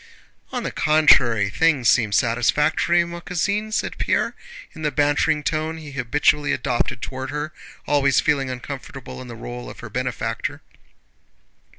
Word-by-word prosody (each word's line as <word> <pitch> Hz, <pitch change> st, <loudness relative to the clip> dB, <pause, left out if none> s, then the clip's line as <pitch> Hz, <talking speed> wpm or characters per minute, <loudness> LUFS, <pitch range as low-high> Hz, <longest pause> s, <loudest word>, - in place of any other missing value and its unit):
"On 250 Hz, -2 st, -3 dB
the -, -, -3 dB
contrary, 125 Hz, -9 st, +4 dB
things 145 Hz, -2 st, +2 dB
seem 110 Hz, -2 st, +4 dB
satisfactory, 150 Hz, -, +2 dB
ma 170 Hz, 0 st, -7 dB
cousine," 200 Hz, +6 st, -2 dB
said -, -, -2 dB
Pierre -, -, +1 dB, 0.4 s
in 160 Hz, -, -10 dB
the 150 Hz, -, +1 dB
bantering 145 Hz, +1 st, +1 dB
tone 155 Hz, +1 st, -1 dB
he 155 Hz, -3 st, -9 dB
habitually 145 Hz, +2 st, +1 dB
adopted 125 Hz, -3 st, -1 dB
toward 130 Hz, 0 st, -5 dB
her, 150 Hz, +1 st, -4 dB, 0.3 s
always 140 Hz, -2 st, +3 dB
feeling 140 Hz, -4 st, +1 dB
uncomfortable 130 Hz, +1 st, -7 dB
in 130 Hz, -, -9 dB
the 120 Hz, -, -8 dB
role 120 Hz, +2 st, -7 dB
of -, -, -11 dB
her 120 Hz, -, -9 dB
benefactor. 125 Hz, +1 st, -3 dB
145 Hz, 145 wpm, -22 LUFS, 125-155 Hz, 0.4 s, contrary